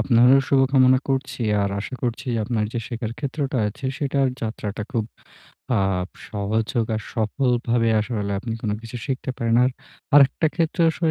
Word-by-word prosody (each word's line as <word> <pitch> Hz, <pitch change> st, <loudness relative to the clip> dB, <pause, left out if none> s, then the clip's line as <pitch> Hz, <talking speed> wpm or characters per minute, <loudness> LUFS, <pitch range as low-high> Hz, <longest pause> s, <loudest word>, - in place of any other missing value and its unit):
আপনারও 125 Hz, +2 st, +5 dB
শুভকামনা 130 Hz, -1 st, +5 dB
করছি। 135 Hz, -2 st, -1 dB, 0.2 s
আর 100 Hz, -, 0 dB
আশা 130 Hz, -, -6 dB
করছি 120 Hz, 0 st, -2 dB, 0.2 s
আপনার 115 Hz, -3 st, 0 dB
যে, 120 Hz, -, -2 dB
শেখার 115 Hz, -1 st, -4 dB
ক্ষেত্রটা 140 Hz, -2 st, -2 dB
আছে, 110 Hz, -, -10 dB
সেটার 140 Hz, -2 st, +1 dB
যাত্রাটা 110 Hz, -1 st, -4 dB
খুব 115 Hz, -3 st, 0 dB, 0.8 s
আপ 95 Hz, -1 st, 0 dB, 0.2 s
সহজ 105 Hz, +1 st, -1 dB
হোক 115 Hz, -2 st, +1 dB
আর 110 Hz, -, -4 dB
সফলভাবে 120 Hz, 0 st, +1 dB
আসলে 105 Hz, -3 st, -2 dB
আপনি 115 Hz, +1 st, -4 dB
কোন 105 Hz, -, -1 dB
কিছু 120 Hz, +2 st, -7 dB
শিখতে 130 Hz, -1 st, -2 dB
পারেন। 115 Hz, -2 st, +2 dB
আর 130 Hz, -, +2 dB, 0.4 s
আরেকটা 145 Hz, +2 st, +6 dB
ক্ষেত্র 165 Hz, 0 st, 0 dB
আসলে 160 Hz, 0 st, 0 dB
120 Hz, 155 wpm, -23 LUFS, 110-135 Hz, 0.8 s, আরেকটা